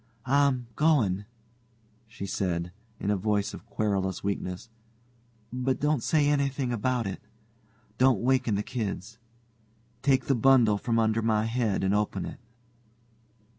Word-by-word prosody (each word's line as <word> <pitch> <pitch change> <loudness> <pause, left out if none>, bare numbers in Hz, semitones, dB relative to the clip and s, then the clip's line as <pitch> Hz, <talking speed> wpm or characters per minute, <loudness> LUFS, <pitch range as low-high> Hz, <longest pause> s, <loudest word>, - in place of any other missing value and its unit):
"I'm 135 -2 +2
going," 115 - +2 0.8
she 110 -3 -7
said, 90 -3 -2 0.3
in 100 - -1
a - - +2
voice 100 +1 0
of - - -10
querulous 95 -3 -1
weakness, 95 -1 -3 0.9
"but 130 +1 -1
don't 150 -3 +1
say 150 +2 +2
anything 140 -3 0
about 120 +1 0
it. 95 - -5 0.8
Don't 130 -4 +4
waken 125 -3 +2
the 100 - -1
kids. 110 -2 -5 0.8
Take 135 -2 +2
the 140 - +2
bundle 120 -4 +4
from 115 0 0
under 110 0 +2
my 110 -1 +1
head 115 -4 0
and 95 +1 +2
open 105 0 0
it." - - -8
115 Hz, 135 wpm, -28 LUFS, 100-130 Hz, 0.9 s, Don't